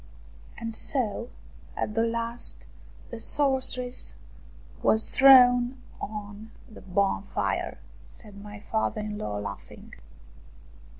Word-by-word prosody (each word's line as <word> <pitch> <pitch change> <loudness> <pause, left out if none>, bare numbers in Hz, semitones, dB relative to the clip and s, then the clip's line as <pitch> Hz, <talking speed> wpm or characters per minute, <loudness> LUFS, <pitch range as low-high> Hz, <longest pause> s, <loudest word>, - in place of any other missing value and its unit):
" - - -22
And 230 -1 -5
so 235 -1 0 0.5
at 210 - -2
the 225 - +1
last 230 +1 -2 0.5
the 235 - -6
sorceress 260 -2 +1 0.7
was 220 0 +3
thrown 250 -1 +6 0.2
on 210 +1 -7 0.2
the 220 - -14
bonfire! 195 +1 -1 0.2
" - - -23
said 205 -3 -11
my 205 0 -10
father 220 -1 -1
in 210 0 -5
law, 105 -1 -4
laughing. 100 -1 -9
220 Hz, 110 wpm, -27 LUFS, 205-245 Hz, 0.7 s, thrown